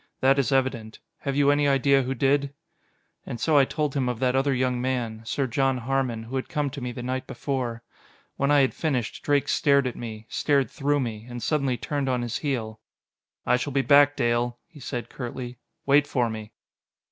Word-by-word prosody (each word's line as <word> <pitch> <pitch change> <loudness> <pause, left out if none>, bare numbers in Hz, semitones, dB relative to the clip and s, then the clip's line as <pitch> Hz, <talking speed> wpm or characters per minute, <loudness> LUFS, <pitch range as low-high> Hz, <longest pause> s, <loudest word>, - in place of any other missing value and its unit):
"That 135 +1 +4
is 140 +1 +1
evident. 130 -5 0 0.2
Have 140 -1 -3
you 145 0 +4
any 145 0 +2
idea 140 0 +4
who 130 +1 -2
did?" 140 +2 +1 0.7
And 120 - -6
so 150 +3 +4
I 135 - +5
told 150 0 -2
him 130 -3 +1
of 125 - -2
that 125 +1 +1
other 135 +1 +2
young 125 -1 0
man. 120 -4 -2
Sir 135 +5 -1
John 135 +1 +1
Harmon, 125 -2 -1
who 125 +4 -4
had 130 - -4
come 150 -4 -1
to 140 0 -7
me 125 0 -3
the 120 0 -7
night 130 +1 -3
before. 125 -4 -3 0.5
When 140 - 0
I 145 -1 +5
had 130 - +2
finished. 130 -9 -2
Drake 145 -1 +2
stared 140 -1 +3
at 125 - -2
me 110 -2 -7
stared 140 -3 +1
through 145 +1 0
me 115 -2 -5
and 120 -2 -6
suddenly 135 -3 0
turned 140 0 -2
on 125 -1 0
his 120 -1 -3
heel. 115 -7 -3 0.7
"I 125 - +3
shall 140 +2 -4
be 135 0 +2
back, 145 0 +6
Dale," 120 +1 0
he 170 -3 -16
said 125 -2 -5
curtly. 125 -1 -6 0.3
"Wait 145 +1 +4
for 120 -4 0
me!" 110 -1 -7
130 Hz, 205 wpm, -25 LUFS, 120-140 Hz, 0.7 s, back